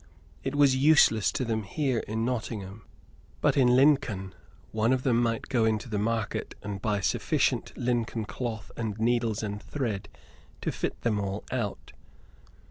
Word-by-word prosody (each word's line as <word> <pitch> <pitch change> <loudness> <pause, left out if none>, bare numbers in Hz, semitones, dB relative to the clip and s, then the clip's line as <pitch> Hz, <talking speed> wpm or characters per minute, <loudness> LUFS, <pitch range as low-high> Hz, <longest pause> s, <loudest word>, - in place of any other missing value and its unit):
It 135 +1 -2
was 140 -2 +5
useless 130 -6 +5
to 130 - -1
them 110 -1 -1
here 130 +3 -1
in 110 +1 -1
Nottingham; 110 -4 -4 0.5
but - - +2
in 125 -3 +5
Lincoln 125 -9 +3 0.4
one 110 +3 +2
of 130 -1 0
them 120 -3 +3
might 115 -1 0
go 120 -3 +1
in 110 -1 +3
to 115 - -9
the 105 -3 -2
market 115 0 -2
and 100 -2 -5
buy 105 -2 0
sufficient - - +1
Lincoln 120 -2 -1
cloth 115 -1 -5
and 110 -3 -3
needles 115 -1 +1
and 105 0 -4
thread 110 -4 -3 0.5
to - - -1
fit - - -3
them 110 -3 +1
all 100 0 -3
out. 115 -5 -3
115 Hz, 160 wpm, -28 LUFS, 105-125 Hz, 0.5 s, was